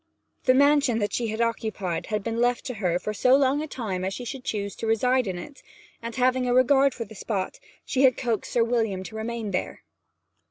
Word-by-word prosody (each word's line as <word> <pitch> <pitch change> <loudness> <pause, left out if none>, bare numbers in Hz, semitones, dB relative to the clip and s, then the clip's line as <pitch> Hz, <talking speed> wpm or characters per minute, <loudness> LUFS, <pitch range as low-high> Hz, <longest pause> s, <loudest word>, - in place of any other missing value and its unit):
The 255 - +5
mansion 285 -3 +4
that 205 -2 -1
she 225 -2 -2
occupied 220 -6 -2
had 210 -2 -2
been 230 +1 -2
left 245 0 +1
to 255 - -3
her 175 -2 +2
for 215 +4 -4
so 255 +5 +4
long 275 +1 +2
a 310 - -4
time 205 -10 -4
as 190 +1 -2
she 245 - -6
should 255 +2 -6
choose 200 -4 -3
to 225 - -4
reside 250 +2 +2
in 185 -2 -3
it, 275 +11 -10 0.4
and, 230 0 -6
having 255 0 +2
a 245 - +2
regard 270 +1 +4
for 230 - -4
the 220 - -13
spot, 195 -2 -3 0.3
she 265 - 0
had 260 -2 +5
coaxed 235 -5 -2
Sir 235 - +4
William 225 -5 0
to 220 - -9
remain 220 -1 -4
there. 185 - -3
230 Hz, 215 wpm, -25 LUFS, 210-255 Hz, 0.4 s, The